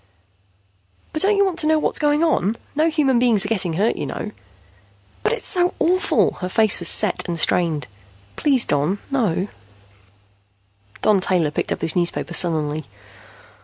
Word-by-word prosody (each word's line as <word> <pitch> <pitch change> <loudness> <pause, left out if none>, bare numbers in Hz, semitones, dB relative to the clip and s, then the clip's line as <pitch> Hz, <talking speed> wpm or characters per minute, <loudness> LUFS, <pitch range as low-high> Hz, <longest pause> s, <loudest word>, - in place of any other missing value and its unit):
"But 310 - -2
don't 405 +1 +2
you 400 - +4
want 360 -3 -3
to 305 - +2
know 315 0 +3
what's 305 - 0
going 295 +1 +1
on? 230 - 0 0.2
No 310 +3 +1
human 285 -6 +1
beings 230 -5 +2
are - - -4
getting 185 -6 -1
hurt, 205 +8 0
you - - -4
know." 210 - -6 0.9
"But - - 0
it's - - -3
so 355 -1 +2
awful!" 365 +2 +1
Her 180 - -3
face 220 +1 +3
was 170 - 0
set 210 0 +2
and 170 -1 -4
strained. 160 -5 +1 0.5
"Please, 270 -5 +2
no, 150 +7 0
Don." 205 -7 -1 1.5
Don 205 -3 +3
Taylor 175 -5 +1
picked - - -3
up - - -3
his 160 - +3
newspaper 175 0 -1
sullenly. 155 -4 0
210 Hz, 165 wpm, -20 LUFS, -, 1.5 s, you